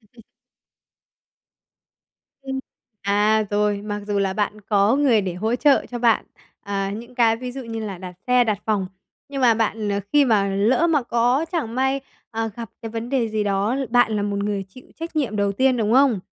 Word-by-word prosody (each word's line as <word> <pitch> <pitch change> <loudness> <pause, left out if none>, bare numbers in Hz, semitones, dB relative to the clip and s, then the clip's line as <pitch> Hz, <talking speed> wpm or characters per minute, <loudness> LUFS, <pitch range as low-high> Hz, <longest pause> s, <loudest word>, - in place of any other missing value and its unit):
Ừm. 230 +1 -20 2.2
Ừm. 265 0 -4 0.4
À, 210 +2 +3
rồi. 205 0 +1
Mặc 205 0 -4
dù 205 -1 0
là 195 -1 +1
bạn 210 +1 -2
có 205 +3 +2
người 265 -7 +4
để 185 -3 -3
hỗ 220 +6 -1
trợ 280 +1 +3
cho 245 - -4
bạn, 230 -2 +3 0.4
à, 195 -1 -2
những 235 +4 -8
cái 230 -2 +3
ví 250 +1 -6
dụ 270 - -6
như 225 -1 -5
là 195 -3 -6
đặt 180 0 -8
xe, 250 -1 +4
đặt 215 -3 0
phòng, 205 -4 +1 0.4
nhưng 275 -1 -4
mà 235 -2 +6
bạn, 220 -1 -1
ờ, 200 0 0
khi 290 -1 +6
mà 210 -5 +2
lỡ 215 +11 +2
mà 300 -6 +2
có 240 +5 +1
chẳng 240 -9 -2
may, 265 +1 +1 0.3
ờ, 225 -1 -2
gặp 230 -4 -7
cái 225 - -5
vấn 230 +1 -5
đề 250 -3 0
gì 215 -1 -1
đó, 200 +4 0
bạn 245 -3 +3
là 205 - 0
một 205 0 -2
người 205 -1 -2
chịu 255 +6 -15
trách 330 0 -7
nhiệm 250 -9 0
đầu 200 -1 +1
tiên, 260 +4 +2
đúng 220 -2 0
không? 260 -5 +4
225 Hz, 200 wpm, -22 LUFS, 205-250 Hz, 2.2 s, mà